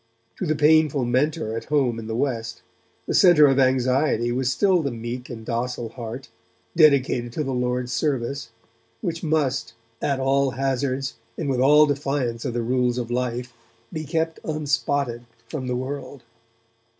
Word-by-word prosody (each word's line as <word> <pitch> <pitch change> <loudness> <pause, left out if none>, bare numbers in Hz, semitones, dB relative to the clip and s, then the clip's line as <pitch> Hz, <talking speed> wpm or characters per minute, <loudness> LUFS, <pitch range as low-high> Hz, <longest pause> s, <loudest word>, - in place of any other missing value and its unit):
To 185 - -3
the 155 - +1
painful 150 -3 +4
mentor 125 -2 0
at 115 - -5
home 130 -6 +1
in 110 - -7
the 110 - -3
West, 115 -3 -2 0.4
the - - -2
centre 175 -5 +7
of 135 -1 +3
anxiety 130 -1 +2
was 130 +1 0
still 185 +5 +3
the 140 - -1
meek 120 +1 -6
and 115 -3 -8
docile 120 0 -3
heart, 120 +2 -7 0.5
dedicated 135 -6 +3
to 155 - -1
the 135 -2 -3
Lord's 125 0 -1
service, 135 -1 -1 0.5
which 165 -1 -3
must, 145 -7 -1 0.3
at 140 -2 0
all 135 +1 +2
hazards 135 -1 -1 0.2
and 160 - -3
with 130 -2 0
all 150 +3 +6
defiance 135 -4 -2
of 120 -3 -3
the 120 - 0
rules 125 0 +1
of 120 -1 -3
life, 125 0 -2 0.4
be 155 -1 -3
kept 160 +2 -2
unspotted 140 -5 -1 0.2
from 130 0 -5
the 125 - -1
world. 135 +1 -5
130 Hz, 160 wpm, -23 LUFS, 120-145 Hz, 0.5 s, centre